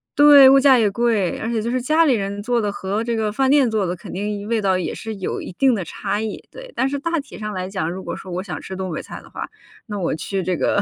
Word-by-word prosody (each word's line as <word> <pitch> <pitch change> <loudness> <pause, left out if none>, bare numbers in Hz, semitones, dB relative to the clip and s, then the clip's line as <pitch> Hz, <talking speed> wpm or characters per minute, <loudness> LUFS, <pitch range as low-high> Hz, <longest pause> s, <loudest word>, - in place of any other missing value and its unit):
对， 290 -2 +9
物 275 0 +7
价 270 -1 +6
也 220 -4 +3
贵。 220 -4 +1
而 225 - -3
且 230 -2 -1
就 235 +2 -2
是 255 0 0
家 310 +5 +3
里 280 - +4
人 200 -2 -2
做 240 0 +1
的 205 -1 -1
和 200 +2 -3
这 235 -1 -1
个 215 -1 -1
饭 265 +4 +1
店 275 -3 +4
做 215 -3 +1
的 180 - -2
肯 170 - -11
定 205 +1 -4
味 225 -1 0
道 190 -2 +2
也 185 - -3
是 220 -1 -6
有 190 - -4
一 - - -7
定 260 +6 +3
的 200 - -1
差 205 +5 -3
异， 220 -1 -4
对。 - - -11
但 260 - +1
是 280 +1 -2
大 335 +3 -1
体 280 - -10
上 210 -1 -4
来 185 0 -3
讲， 185 -5 -2
如 185 +2 -6
果 - - -5
说 185 - -9
我 180 +2 -3
想 190 - -6
吃 190 - -7
东 185 -1 -4
北 155 - -4
菜 - - -9
的 - - -17
话， - - -6 0.4
那 210 - -4
我 175 - -1
去 185 +4 -3
这 180 0 -1
个 205 - +1
215 Hz, 315 characters per minute, -21 LUFS, 190-255 Hz, 0.4 s, 对